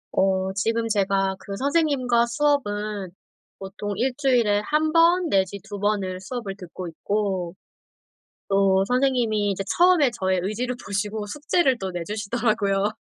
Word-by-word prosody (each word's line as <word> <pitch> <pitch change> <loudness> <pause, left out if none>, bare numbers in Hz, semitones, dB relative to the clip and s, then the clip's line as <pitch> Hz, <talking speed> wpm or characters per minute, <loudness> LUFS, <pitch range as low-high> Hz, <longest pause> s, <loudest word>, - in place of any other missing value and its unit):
어 190 0 +1
지금 225 +3 -1
제가 195 -2 +1
그 195 +1 -7
선생님과 270 -3 +2
수업은 210 -8 -1 0.5
보통 200 +1 -5
1 255 +4 0
주일에 240 -7 +2
1 310 +1 +1
번 340 +1 +4
내지 195 -2 +1
2 205 -1 -7
번을 195 -3 -1
수업을 200 0 -6
듣고 180 -1 -8
있고 190 0 -2 0.9
또 195 -1 +3
선생님이 245 -5 +1
이제 195 0 -3
처음에 350 -6 +5
저의 190 -5 -1
의지를 235 +6 -2
보시고 205 +1 -3
숙제를 290 - +1
또 190 -2 -4
내주시더라고요. 205 +2 -1
210 Hz, 270 characters per minute, -24 LUFS, 195-250 Hz, 0.9 s, 처음에